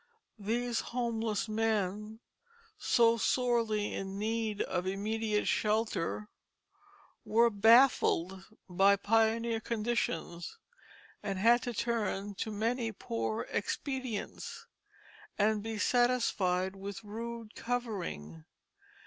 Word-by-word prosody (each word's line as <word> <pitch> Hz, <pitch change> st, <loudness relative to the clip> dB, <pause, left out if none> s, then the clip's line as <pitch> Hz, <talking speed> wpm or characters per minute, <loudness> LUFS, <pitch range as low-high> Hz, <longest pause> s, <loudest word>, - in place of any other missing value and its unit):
These 230 Hz, +3 st, -1 dB
homeless 230 Hz, -3 st, -2 dB
men, 215 Hz, 0 st, -1 dB, 0.6 s
so 230 Hz, -, +4 dB
sorely 230 Hz, -3 st, +1 dB
in 195 Hz, 0 st, -4 dB
need 220 Hz, 0 st, -1 dB
of 180 Hz, +1 st, -2 dB
immediate 210 Hz, +2 st, -1 dB
shelter, 205 Hz, -, 0 dB, 1.0 s
were 230 Hz, +2 st, +4 dB
baffled 205 Hz, -4 st, +4 dB, 0.2 s
by 195 Hz, +2 st, +4 dB
pioneer 225 Hz, +2 st, +2 dB
conditions, 215 Hz, -7 st, -2 dB, 0.6 s
and 195 Hz, -2 st, -3 dB
had 235 Hz, +5 st, +5 dB
to 245 Hz, -, -3 dB
turn 210 Hz, -3 st, -1 dB
to 215 Hz, +3 st, -4 dB
many 225 Hz, +2 st, -1 dB
poor 115 Hz, -, -3 dB
expedients, 255 Hz, +1 st, -4 dB, 0.7 s
and 210 Hz, 0 st, +2 dB
be 225 Hz, +1 st, -4 dB
satisfied 205 Hz, -6 st, +2 dB
with 200 Hz, +2 st, -7 dB
rude 230 Hz, +1 st, -6 dB
covering. 185 Hz, -, -4 dB
215 Hz, 90 wpm, -32 LUFS, 195-230 Hz, 1.0 s, had